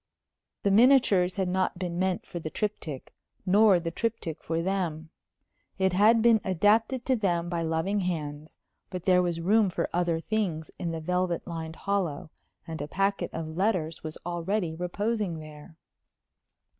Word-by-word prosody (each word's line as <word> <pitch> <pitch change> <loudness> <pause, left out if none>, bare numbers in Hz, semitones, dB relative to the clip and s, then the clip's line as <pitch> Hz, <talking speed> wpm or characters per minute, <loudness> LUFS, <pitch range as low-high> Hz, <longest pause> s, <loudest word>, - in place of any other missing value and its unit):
The 200 - +2
miniatures 210 -6 +5
had 190 -2 0
not 185 0 0
been 175 -1 -3
meant 185 -1 0
for 175 - -6
the 160 - -5
triptych, 160 -9 -4 0.3
nor 200 0 +5
the 165 0 -4
triptych 215 -6 -3
for 165 +1 -2
them. 170 -4 -2 0.7
It 190 -1 +2
had 220 +4 +5
been 230 -2 +5
adapted 215 +7 +2
to 260 - +2
them 175 -6 0
by 170 -1 -1
loving 165 +5 0
hands; 155 -5 -4 0.3
but 180 -2 -6
there 180 -1 +5
was 175 -2 -1
room 205 +4 +3
for - - -2
other 170 -1 +1
things 175 -5 -2
in 175 -3 -2
the 165 -1 -4
velvet 180 +1 -1
lined 160 -2 -6
hollow, 180 -6 -2 0.3
and 160 -3 -6
a 145 - -4
packet 195 +1 0
of 160 -1 -5
letters 180 -5 0
was 155 -1 -6
already 175 +1 -1
reposing 190 +2 -2
there. 155 0 -12
180 Hz, 155 wpm, -28 LUFS, 165-200 Hz, 0.7 s, miniatures